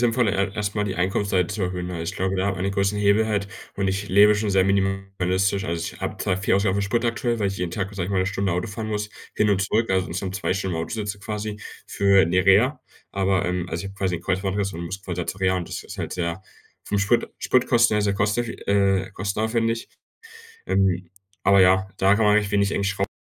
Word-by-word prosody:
sinnvoll, 120 -1 +2
e 100 -1 0
erstmal 105 0 -1
die 100 -2 -3
Einkunftsseite 95 0 +1
zu 100 +1 -4
erhöhen, 90 -1 -2
ne? 85 -2 -4
Ich 85 - -4
glaube, 95 +1 -1
da 95 - 0
wenn - - +2
man - - -8
einen 100 - -1
großen 100 +1 0
Hebel 105 +2 +3
hält 100 -2 -1 0.3
und 100 -1 -1
ich 100 +1 -2
lebe 105 +2 +6
schon 105 0 -1
sehr 95 -1 +3
minimalistisch. 95 -1 0
Also, 85 0 -2
ich - - -15
habe - - -4
zwar 90 - 0
viel 95 - +1
Ausgaben 100 -1 +2
für 100 - 0
Sprit 115 +4 0
aktuell, 115 0 -1
weil 105 - +1
ich 95 0 -3
jeden 90 -1 -3
Tag, 95 +2 -3
sage 95 -3 -2
ich - - -5
mal, 95 - +1
'ne 95 - 0
Stunde 95 -1 -1
Auto 90 +5 -1
fahren 110 +1 -5
muss, 105 -1 -2 0.3
hin 105 - +2
und 95 -1 +2
zurück, 110 +3 0
also, 95 -1 +1
insgesamt 90 +2 -4
2 - - -1
Stunden 95 -2 -2
im 80 - -1
Auto - - -6
sitze 105 -2 -4
quasi 105 0 -5 0.3
für 100 -3 +4
'ne 90 +2 +2
Reha, 125 +8 +4 0.3
aber, 95 -1 +1
ähm, 90 0 -1
also, 85 +3 -3
ich - - -4
habe 100 - -11
quasi 95 -3 -1
ein 85 - -10
Kreuzbandriss 95 +1 -1
und 85 - -5
muss 95 +3 -6
quasi 90 -3 -4
zur 95 - -5
Reha 95 0 +2
und 85 - -4
das - - -5
ist - - -9
halt - - -4
sehr 85 +1 -3 0.4
vom 100 - -1
Sprit 105 +4 +1
Spritkosten 120 -3 +3
sehr 100 -1 +1
kosteffi 105 +4 0 0.2
äh, 100 -2 +2
kostenaufwendig. 110 +4 -1 0.8
Ähm, 95 -2 +1 0.3
aber 100 -1 +6
ja, 95 +1 +4
da 95 +1 +4
kann 110 0 +2
man 105 0 +5
recht 105 -1 +2
wenig 100 -1 +2
eigentlich 100 0 0
schraub 100 0 -1
100 Hz, 240 wpm, -23 LUFS, 95-105 Hz, 0.8 s, lebe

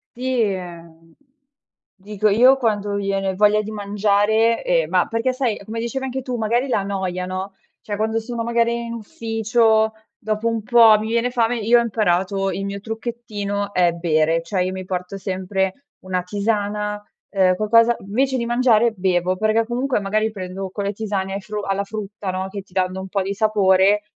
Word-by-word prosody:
Sì, 255 0 -1
ehm, 170 -5 -5 0.8
dico, 210 +1 -2
io 250 +6 +6
quando 210 -5 -1
viene 195 -1 -1
voglia 210 +1 +4
di 215 - -7
mangiare 210 +2 +1
ehm, - - +1
ma - - +2
perché, 230 +3 0
sai, 255 -4 0
è 200 - -13
come 225 +2 -5
dicevi 250 +3 -3
anche 265 0 -3
tu, 250 -1 -3
magari 235 +4 0
la 235 -6 +1
noia, 190 -2 -3
no, 190 +1 -5 0.3
cioè, 205 - -4
quando 220 +1 0
sono, 230 +1 -4
magari, 235 0 0
in 230 - -5
ufficio, 225 0 +1 0.2
dopo 215 +1 -2
un 230 -2 -1
po' 230 -2 +6
mi 215 - -4
viene 235 +2 +1
fame, 240 -1 +1
io 230 +3 +4
ho - - +3
imparato 195 -3 0
il 195 - -4
mio 200 0 -4
trucchettino 210 -2 -4
è 175 -1 +3
bere. 165 -1 +1
Cioè, 180 +2 -1
io 185 - -2
mi 185 0 -6
porto 180 +1 -4
sempre 190 +5 -3
una 185 -1 -3
tisana, 210 +1 -2 0.3
uhm, 185 -2 +3
qualcosa 230 +4 +4
invece, 260 +7 0
di 235 - -2
mangiare 240 -1 +3
bevo 185 -2 0
perché, 215 +2 +2
comunque, 250 0 0
magari, 215 +2 0
prendo 190 -1 -6
con 200 +1 -4
le 200 - -1
tisane 200 -2 -3
ai 200 - -4
fru 210 +1 -5
alla 195 0 -1
frutta, 205 -1 -5
no, 185 +1 -3
che 200 0 -6
ti 185 - -25
danno 185 0 -1
un 190 - -7
po' 195 +1 0
di 195 +1 -2
sapore 200 -1 +3
210 Hz, 185 wpm, -21 LUFS, 190-230 Hz, 0.8 s, io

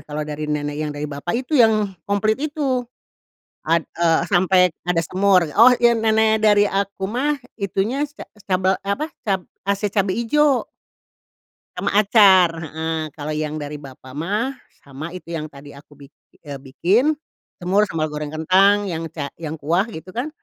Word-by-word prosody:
kalau 150 0 -3
dari 150 0 -5
nenek 145 -1 -2
yang 150 -1 -2
dari 145 - -4
bapak 175 - -3
itu 285 - -12
yang 215 -3 +2 0.2
komplit 215 +4 +1
itu, 290 -4 -1 0.8
ad 165 +1 +1 0.2
eee, 165 -1 +4
sampai 185 +1 +4 0.3
ada 175 -2 +2
semur. 185 +1 +3
Oh 230 +4 +8
iya 240 0 +5
nenek 220 -1 +2
dari 205 -1 +5
aku 195 -1 -2
mah 270 +8 -1 0.2
itunya 200 +7 -1
si 295 - -27
ca - - -7
eee, 210 - -26
sicabel, 190 -1 +1
eh 200 - -5
apa, 305 - -3 0.2
cab 195 -3 0 0.3
ase 200 +1 +1
cabe 195 -2 0
ijo 275 +3 +2 1.1
sama - - -1
acar, 200 -4 +6 0.2
heeh. 160 0 -3
Kalau 155 0 -4
yang 150 0 -3
dari 150 0 -6
bapak 130 -1 -12
mah, 205 - -2 0.3
sama 140 +4 -7
itu 175 -1 -9
yang 155 -1 -4
tadi 145 0 -13
aku 145 +1 -16
bik 140 - -23 0.3
eee, 140 -2 -7
bikin 200 - +1 0.4
semur 195 +4 +1
sambel 160 -1 -1
goreng 150 0 -4
kentang, 190 +6 +3
yang 165 -3 -4
ca 145 -3 -6
yang 160 0 -5
kuah, 170 +9 0
gitu 185 -2 -10
kan, 255 +6 -3
185 Hz, 170 wpm, -21 LUFS, 155-215 Hz, 1.1 s, Oh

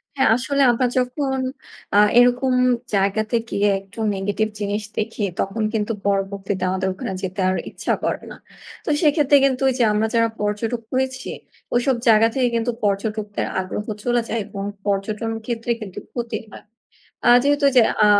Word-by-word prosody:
হ্যাঁ, 265 - +3
আসলে 280 +3 0
আমরা 250 +2 +1
যখন, 265 +1 0 0.6
আ - - +6 0.2
এরকম 245 +1 +4 0.4
জায়গাতে 200 +3 +1
গিয়ে 205 +1 +2
একটু 195 +3 -14 0.2
negative 205 +3 -1
জিনিস 205 +1 -2
দেখি 220 0 -2 0.2
তখন 215 +3 -1
কিন্তু 215 0 -1
পরবর্তীতে 195 -1 -1
আমাদের 190 +1 -1
ওখানে 190 - -5
যেতে 190 +1 -4
আর 185 - +1
ইচ্ছা - - -2
করে - - -1
না। - - -9 0.5
তো - - -2
সেক্ষেত্রে 295 -2 +4
কিন্তু 260 -1 0
ঐ - - +2
যে 245 - +3
আমরা 215 +1 +1
যারা 230 0 +3
পর্যটক 215 +3 -1
হয়েছি, 260 0 -1 0.5
ওইসব 245 +2 +2
জায়গা 225 0 +6
থেকে 260 -2 +2
কিন্তু 230 +1 0
পর্যটকদের 205 +1 -1
আগ্রহ 190 +3 -4 0.2
চলে 240 -1 +2
যায় 230 - -1
এবং 200 -1 -6 0.2
পর্যটন 210 +3 -1
ক্ষেত্রে 235 0 -2
কিন্তু 195 -4 -7
ক্ষতি 240 -1 -3
হয়। - - -12 0.6
আ - - +7
যেহেতু 285 +1 +3
যে, 245 - +8 0.2
আ - - +6
220 Hz, 160 wpm, -21 LUFS, 200-250 Hz, 0.6 s, যে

